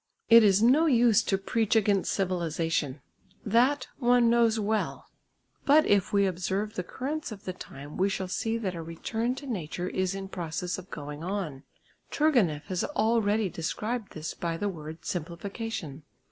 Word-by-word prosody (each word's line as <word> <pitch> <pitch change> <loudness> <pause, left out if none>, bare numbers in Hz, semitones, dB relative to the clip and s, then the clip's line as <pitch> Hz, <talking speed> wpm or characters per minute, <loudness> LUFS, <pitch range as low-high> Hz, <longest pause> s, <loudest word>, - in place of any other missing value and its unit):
It 230 0 +10
is 200 0 +4
no 285 +8 +5
use 235 -6 +5
to 195 - +1
preach 220 +3 0
against 205 -3 +2
civilisation, 165 -6 -1 0.4
that 245 +7 +3
one 245 -2 +4
knows 230 -2 +3
well, 215 +1 -1 0.6
but 300 +2 +5
if 200 -2 +2
we 200 -1 +3
observe 190 +3 -2
the - - -2
currents 275 - -4
of 205 -2 -9
the 185 - -3
time 145 -4 -10
we 190 +2 +2
shall 190 -1 -3
see 225 +5 -1
that 200 -5 -3
a 170 - -5
return 225 +9 -3
to 280 - -9
nature 180 - -4
is 185 0 -1
in 195 0 -5
process 175 -1 -4
of 185 - -12
going 150 +1 -7
on. 175 -8 -4 0.4
Turgenieff 230 - +2
has 185 -3 -2
already 220 -5 +1
described 210 +7 -4
this 155 0 -5
by 165 -1 -3
the 205 +4 -1
word 160 -2 -8
"simplification." 175 - -5
195 Hz, 160 wpm, -28 LUFS, 170-230 Hz, 0.6 s, It